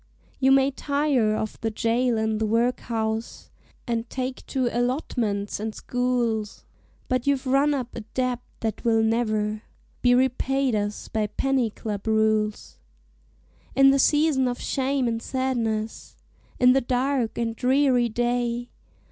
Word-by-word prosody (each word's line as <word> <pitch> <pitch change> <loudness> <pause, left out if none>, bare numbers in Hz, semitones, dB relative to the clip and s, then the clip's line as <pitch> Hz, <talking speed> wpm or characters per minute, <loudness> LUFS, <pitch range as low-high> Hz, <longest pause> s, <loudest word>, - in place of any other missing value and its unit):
"You 265 0 +4
may 270 0 +4
tire 280 -6 +1
of 215 0 -4
the 225 - 0
jail 230 +2 +1
and 220 0 -1
the 220 - +1
workhouse, 225 -1 -1 0.3
And 235 -1 -2
take 260 0 -4
to 260 -3 0
allotments 240 -6 -1
and 215 0 -4
schools, 240 -4 -1 0.4
But 255 0 -1
you 280 - +4
've 260 - -14
run 275 +3 +3
up 255 -3 -4
a - - -4 0.2
debt 255 -2 0 0.2
that 220 -2 -3
will 225 -1 +3
never 215 -2 0 0.4
Be 245 0 +5
repaid 265 +1 +1
us 205 0 -2
by 215 -1 -1
penny 260 +2 0
club 210 -1 -6
rules. 215 -1 0 1.0
"In 270 0 +7
the 275 - +2
season 295 -2 +3
of 245 0 -3
shame 270 -1 0
and 230 -1 -2
sadness, 230 -5 -2 0.4
In 250 0 +6
the 270 - +3
dark 255 -1 0
and 230 -1 -1
dreary 255 -1 +2
day. 240 +1 -1
240 Hz, 140 wpm, -25 LUFS, 220-260 Hz, 1.0 s, In